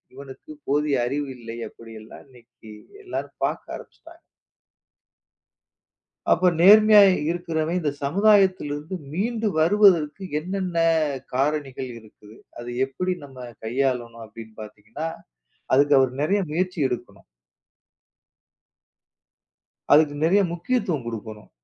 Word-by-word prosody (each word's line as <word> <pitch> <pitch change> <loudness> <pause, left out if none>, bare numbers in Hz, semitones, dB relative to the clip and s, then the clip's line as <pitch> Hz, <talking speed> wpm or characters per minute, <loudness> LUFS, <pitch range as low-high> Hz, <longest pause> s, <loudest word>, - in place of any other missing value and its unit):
இவனுக்குப் 140 - -12
போதிய 145 0 +1
அறிவு 140 +2 -3
இல்லை. 115 -1 -9
அப்டி 115 -1 -14
எல்லாம் 110 - -13
இன்னைக்கு 120 -3 -17 0.3
எல்லாரும் 370 - -6
பார்க்க - - -4
ஆரம்பிச்சுட்டாங்க. 330 +1 -15 2.1
அப்ப 180 0 +4
நேர்மையா 210 +3 +8 0.3
இருக்கிறவன் 170 -1 -2
இந்த 150 -4 -1
சமுதாயத்திலிருந்து 185 -3 +2 0.2
மீண்டு 220 +4 -1
வருவதற்கு 185 -1 +3 0.2
என்னென்ன 185 +1 -4 0.6
காரணிகள் 135 -2 -2
இருக்குது? 110 0 -18 0.2
அதை 120 0 -7 0.2
எப்டி 180 +7 -3
நம்ம 135 -2 -16 0.3
கையாளணும் 120 -2 -2
அப்டின்னு 110 0 -13
பாத்தீங்கன்னா, 110 +9 -8 0.7
அதுக்கு 145 +1 +4
அவர் 130 -1 +1
நெறைய 200 +7 +1
முயற்சி 180 +3 -2
எடுக்கணும். 115 -5 -7 2.7
அதுக்கு 150 -1 +5
நெறைய 195 +5 +4
முக்கியத்துவம் 175 - -2
குடுக்கணும். 110 -2 -8
150 Hz, 95 wpm, -23 LUFS, 125-185 Hz, 2.7 s, நேர்மையா